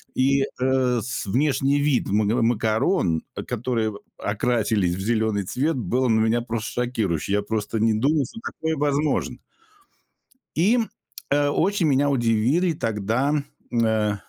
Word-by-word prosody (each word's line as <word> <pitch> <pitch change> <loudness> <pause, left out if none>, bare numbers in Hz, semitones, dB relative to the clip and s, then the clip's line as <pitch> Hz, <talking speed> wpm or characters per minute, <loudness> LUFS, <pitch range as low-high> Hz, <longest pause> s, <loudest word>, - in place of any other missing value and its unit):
и, 135 +1 +3
э, 130 -2 0
с 125 +5 -4
внешний 135 +5 +1
вид 145 -3 +1
мн 110 +3 +2
макарон, 110 - +1 0.2
которые 115 -2 -1 0.2
окрасились 105 -4 0
в 95 - -7
зеленый 110 -1 0
цвет, 145 - -1
был 125 +2 0
на 110 -1 +3
меня 115 +2 +2
просто 120 +1 -3
шокирующий. 100 -7 -2
Я 105 - +2
просто 110 +1 -3
не 110 0 +3
думал, 140 +6 +2
что - - -10
такое 160 -5 -3
возможно. 145 +1 0 1.2
И, 190 +9 +4
м, 230 -3 0 0.4
э, 145 0 +2
очень 190 +3 +1
меня 145 0 +3
удивили 130 +7 +2
тогда, 115 +3 -1 0.4
э, 110 -3 +1
120 Hz, 135 wpm, -23 LUFS, 110-140 Hz, 1.2 s, И